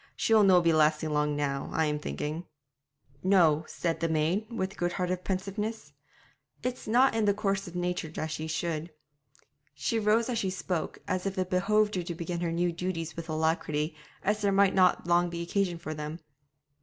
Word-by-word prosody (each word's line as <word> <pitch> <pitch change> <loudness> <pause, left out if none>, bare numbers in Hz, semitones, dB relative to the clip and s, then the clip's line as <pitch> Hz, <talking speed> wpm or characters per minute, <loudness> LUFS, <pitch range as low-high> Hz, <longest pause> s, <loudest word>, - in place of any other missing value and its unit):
She'll 220 -1 +4
no' 185 -2 +6
be 165 -1 +4
lasting 155 0 +3
long 150 0 +1
now, 140 -1 -2
I'm 150 -2 0
thinking.' 150 - -4 0.7
'No,' 170 -5 +4
said 165 -2 -2
the 165 0 0
maid, 160 +7 +1
with 195 -4 -3
good 175 -2 -1
hearted 180 -1 -2
pensiveness; 195 -3 -3 0.7
'it's 250 -1 -3
not 250 +5 +4
in 225 -1 +1
the 205 -1 +3
course 195 -2 -1
of 175 - -9
nature 180 -2 -1
that 155 0 -4
she 155 +1 -4
should.' 160 0 -2 0.9
She 230 - 0
rose 220 +2 +3
as 240 -3 -1
she 195 - 0
spoke, 180 -2 -3
as 185 +1 -1
if 195 0 -4
it 185 0 -1
behoved 210 +3 +2
her 185 - 0
to 170 0 -5
begin 170 +1 -4
her 170 -1 -1
new 175 +1 +1
duties 165 -2 -4
with 165 0 -7
alacrity, 155 -1 0 0.3
as 210 +1 +1
there 200 -1 +2
might 195 0 +4
not 185 -3 +4
long 175 0 +3
be 170 0 -4
occasion 180 0 0
for 155 -1 -5
them. 150 +1 -5
175 Hz, 185 wpm, -29 LUFS, 160-195 Hz, 0.9 s, no